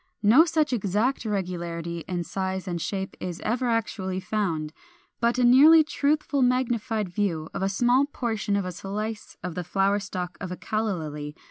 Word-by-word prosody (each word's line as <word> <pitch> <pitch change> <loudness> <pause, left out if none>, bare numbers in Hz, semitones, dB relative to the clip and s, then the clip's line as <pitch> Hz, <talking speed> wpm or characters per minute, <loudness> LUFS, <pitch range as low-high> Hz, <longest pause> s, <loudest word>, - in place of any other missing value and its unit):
No 245 +11 +7
such 310 -4 +1
exact 220 +4 0
regularity 170 -4 -3
in 180 -2 -2
size 190 +1 -3
and 175 -2 -3
shape 190 +1 -3
is 180 -2 -5
ever 245 +3 0
actually 205 -5 -1
found; 170 -7 -2 0.5
but 235 +1 +2
a 250 - +2
nearly 295 +7 +8
truthful 295 -1 0
magnified 240 -4 +1
view 175 -4 -2
of - - -4
a 195 - +1
small 245 +7 +3
portion 225 -7 -2
of 200 -2 0
a 185 - -3
slice 210 +4 -5
of 180 -1 -4
the 180 - -4
flower 195 +3 +1
stalk 180 -3 -5
of 185 -2 -5
a 180 - -5
Calla 215 -3 -1
Lily 150 -2 -6
(Fig. - - -31
200 Hz, 175 wpm, -26 LUFS, 180-240 Hz, 0.5 s, nearly